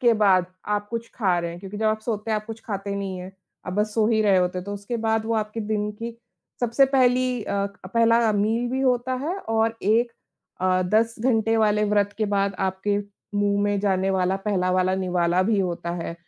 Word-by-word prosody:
के 240 Hz, -2 st, +5 dB
बाद 195 Hz, -4 st, +4 dB, 0.2 s
आप 205 Hz, 0 st, -1 dB
कुछ 230 Hz, 0 st, -4 dB
खा 190 Hz, -7 st, +1 dB
रहे 170 Hz, 0 st, -2 dB
हैं, 170 Hz, -, -8 dB
क्योंकि 195 Hz, +1 st, -8 dB
जब 220 Hz, +1 st, 0 dB
आप 215 Hz, 0 st, +1 dB
सोते 220 Hz, -1 st, -3 dB
हैं, 215 Hz, -, +2 dB
आप 210 Hz, -, -4 dB
कुछ 225 Hz, 0 st, -7 dB
खाते 200 Hz, -2 st, -3 dB
नहीं 195 Hz, -2 st, -4 dB
हैं। 180 Hz, +1 st, -8 dB, 0.3 s
आप 180 Hz, -, -3 dB
बस 210 Hz, +2 st, -1 dB
सो 220 Hz, -2 st, +3 dB
ही 220 Hz, -2 st, +2 dB
रहे 200 Hz, -3 st, +4 dB
होते 180 Hz, 0 st, +1 dB
हैं, 180 Hz, -, -6 dB
तो 200 Hz, -, -5 dB
उसके 205 Hz, +4 st, -4 dB
बाद 220 Hz, -1 st, 0 dB
वो 230 Hz, -, 0 dB
आपके 215 Hz, +1 st, -2 dB
दिन 210 Hz, -1 st, -1 dB
की 230 Hz, +2 st, -7 dB, 0.4 s
सबसे 245 Hz, +3 st, +4 dB
पहली 255 Hz, -2 st, +3 dB
अ, 200 Hz, -1 st, -1 dB
क 200 Hz, -2 st, -12 dB
पहला 230 Hz, 0 st, +4 dB
मील 220 Hz, +4 st, +1 dB
भी 260 Hz, +1 st, -1 dB
होता 255 Hz, -1 st, +1 dB
है 340 Hz, +6 st, -2 dB
और 225 Hz, -, 0 dB
एक 230 Hz, +4 st, +2 dB, 0.5 s
अ, 185 Hz, 0 st, +2 dB
10 220 Hz, +5 st, +2 dB
घंटे 225 Hz, -2 st, +2 dB
वाले 210 Hz, -1 st, +3 dB
व्रत 205 Hz, -1 st, +1 dB
के 215 Hz, -, +1 dB
बाद 200 Hz, -1 st, 0 dB
आपके 190 Hz, +2 st, 0 dB, 0.4 s
मुँह 205 Hz, 0 st, +2 dB
में 205 Hz, 0 st, +1 dB
जाने 195 Hz, -1 st, +1 dB
वाला 190 Hz, 0 st, +1 dB
पहला 195 Hz, -2 st, 0 dB
वाला 185 Hz, 0 st, +2 dB
निवाला 180 Hz, -1 st, +1 dB
भी 210 Hz, +2 st, +1 dB
होता 175 Hz, -2 st, -2 dB
है। 165 Hz, -1 st, -4 dB
210 Hz, 220 wpm, -24 LUFS, 190-225 Hz, 0.5 s, के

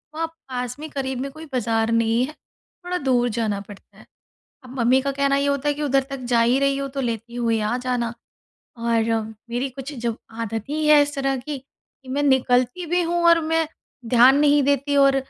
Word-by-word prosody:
वहाँ 325 Hz, 0 st, -1 dB
पास 255 Hz, -6 st, -6 dB
में, 310 Hz, 0 st, -7 dB
क़रीब 265 Hz, -2 st, -3 dB
में 275 Hz, -, -3 dB
कोई 315 Hz, +2 st, -10 dB
बाज़ार 225 Hz, -2 st, 0 dB
नहीं 230 Hz, +1 st, +2 dB
है, 305 Hz, -, -9 dB, 0.5 s
थोड़ा 360 Hz, 0 st, -1 dB
दूर 250 Hz, -5 st, +1 dB
जाना 210 Hz, -3 st, 0 dB
पड़ता 205 Hz, -2 st, -14 dB
है। -, -, -16 dB, 0.6 s
अब 255 Hz, 0 st, -9 dB
मम्मी 255 Hz, +3 st, +4 dB
का 275 Hz, +1 st, -1 dB
कहना 275 Hz, 0 st, +1 dB
ये 280 Hz, 0 st, +1 dB
होता 280 Hz, +1 st, 0 dB
है 290 Hz, -, +3 dB
कि 295 Hz, -, -7 dB
उधर 275 Hz, -1 st, +2 dB
तक 275 Hz, -1 st, -5 dB
जा 230 Hz, -, +5 dB
ही 245 Hz, +3 st, +3 dB
रही 275 Hz, 0 st, +2 dB
हो, 275 Hz, 0 st, -2 dB
तो 275 Hz, 0 st, -4 dB
लेती 235 Hz, 0 st, -4 dB
हुई 230 Hz, -2 st, +1 dB
आ 215 Hz, +4 st, 0 dB
जाना। 245 Hz, -2 st, -2 dB, 0.6 s
और 230 Hz, -1 st, +1 dB, 0.5 s
मेरी 250 Hz, +3 st, -2 dB
कुछ 270 Hz, +3 st, -8 dB
जब 235 Hz, -3 st, -3 dB, 0.2 s
आदत 225 Hz, -1 st, -3 dB
ही 305 Hz, +1 st, -1 dB
है 300 Hz, -1 st, +7 dB
इस 290 Hz, 0 st, -1 dB
तरह 270 Hz, -1 st, 0 dB
की 280 Hz, +3 st, -5 dB
कि 265 Hz, 0 st, -20 dB
मैं 285 Hz, +2 st, -1 dB
निकलती 255 Hz, +3 st, +2 dB
भी 350 Hz, +2 st, +1 dB
हूँ 345 Hz, 0 st, 0 dB
और 335 Hz, 0 st, +6 dB
मैं 325 Hz, 0 st, 0 dB, 0.5 s
ध्यान 255 Hz, +4 st, +7 dB
नहीं 290 Hz, -1 st, +4 dB
देती, 285 Hz, +1 st, +1 dB
और 275 Hz, -1 st, +5 dB
265 Hz, 210 wpm, -22 LUFS, 240-285 Hz, 0.6 s, है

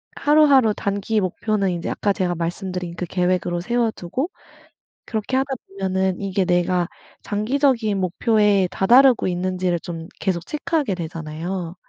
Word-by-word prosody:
하루하루 285 Hz, -7 st, +5 dB
단기 200 Hz, +2 st, -1 dB
목표는 200 Hz, +2 st, 0 dB
인제 170 Hz, -1 st, -3 dB
아까 205 Hz, -, 0 dB
제가 180 Hz, -2 st, -1 dB
말씀드린 175 Hz, +1 st, -4 dB
그 180 Hz, -, -3 dB
계획으로 180 Hz, 0 st, 0 dB
세워두고 235 Hz, -, -1 dB, 0.8 s
그렇게 220 Hz, +4 st, -3 dB
하다 270 Hz, 0 st, 0 dB
보면은 190 Hz, -1 st, -1 dB
이게 195 Hz, -1 st, 0 dB
내가 175 Hz, 0 st, +1 dB, 0.4 s
장기적인 220 Hz, -1 st, +1 dB
목표에 200 Hz, +1 st, +2 dB
다다르고 245 Hz, +5 st, +5 dB
있는지를 180 Hz, -1 st, -1 dB
좀 165 Hz, -1 st, -7 dB
계속 180 Hz, -4 st, -1 dB
체크하게 300 Hz, -, -1 dB
되잖아요. 165 Hz, +1 st, -5 dB
190 Hz, 335 characters per minute, -22 LUFS, 180-225 Hz, 0.8 s, 하루하루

